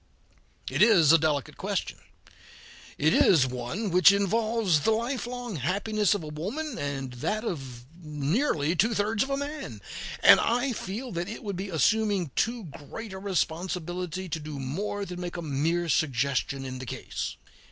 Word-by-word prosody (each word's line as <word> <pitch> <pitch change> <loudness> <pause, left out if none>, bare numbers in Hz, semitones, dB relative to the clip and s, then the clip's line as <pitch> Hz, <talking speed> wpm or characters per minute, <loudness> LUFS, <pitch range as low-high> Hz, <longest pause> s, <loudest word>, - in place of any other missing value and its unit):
It - - 0
is 175 -10 +7
a 165 - +7
delicate 145 -4 -1
question; - - -3 1.0
it 155 +2 +3
is 155 -8 +5
one 130 - -3
which 180 +2 +7
involves 205 -2 +2
the 145 - +1
lifelong 240 - -2
happiness 205 - +1
of 195 - -4
a - - -7
woman, 220 - -4
and 135 -3 -3
that 215 - -2
of 130 - -5 0.2
nearly 155 - 0
two 220 +6 +2
thirds 210 +1 +1
of 270 - +1
a 275 - 0
man, 285 - -5 0.4
and - - +9
I 245 +2 +1
feel 225 +5 -5
that 175 +2 -3
it 225 - -7
would 200 -3 -3
be 195 +2 -4
assuming 200 - +1
too 230 0 0
great 185 +7 -9
a 190 - -6
responsibility 180 -1 -2
to 165 -1 -3
do 150 -1 -7
more 195 +10 -3
than 180 -1 -7
make 175 0 -5
a 170 - -4
mere 160 +4 0
suggestion 140 -3 0
in 130 -1 -5
the 130 - -7
case. - - -4
180 Hz, 165 wpm, -27 LUFS, 150-215 Hz, 1.0 s, and